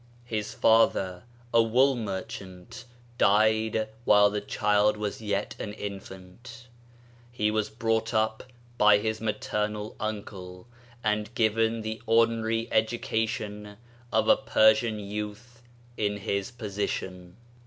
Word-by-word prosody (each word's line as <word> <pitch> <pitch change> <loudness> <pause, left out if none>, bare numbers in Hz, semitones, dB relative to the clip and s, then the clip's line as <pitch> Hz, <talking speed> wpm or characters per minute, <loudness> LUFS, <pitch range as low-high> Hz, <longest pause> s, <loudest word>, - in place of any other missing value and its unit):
His 110 -3 -4
Father 95 -5 +3 0.3
a 115 - +6
wool 130 +4 +3
merchant 100 +1 -7 0.3
died 110 +1 +3 0.2
while 105 -2 +5
the 105 0 -2
child 105 +1 +2
was 105 +1 -4
yet 105 -1 -2
an 105 - -5
infant; 100 +4 -9 0.6
he 105 -3 0
was 110 -1 -1
brought 115 0 -1
up 110 -1 0 0.4
by 105 0 +7
his 110 +1 -2
maternal 105 -1 -2
uncle, 100 -4 -6 0.4
and 105 0 0
given 115 0 +1
the 110 0 -5
ordinary 115 0 +2
edu 110 +2 +1
cation 105 -2 -3 0.3
of 110 0 +2
a - - +7
Persian 110 -3 +3
youth 105 +4 -7 0.4
in 105 -1 -1
his 100 +1 -2
position. 95 -5 -5
110 Hz, 115 wpm, -27 LUFS, 105-115 Hz, 0.6 s, by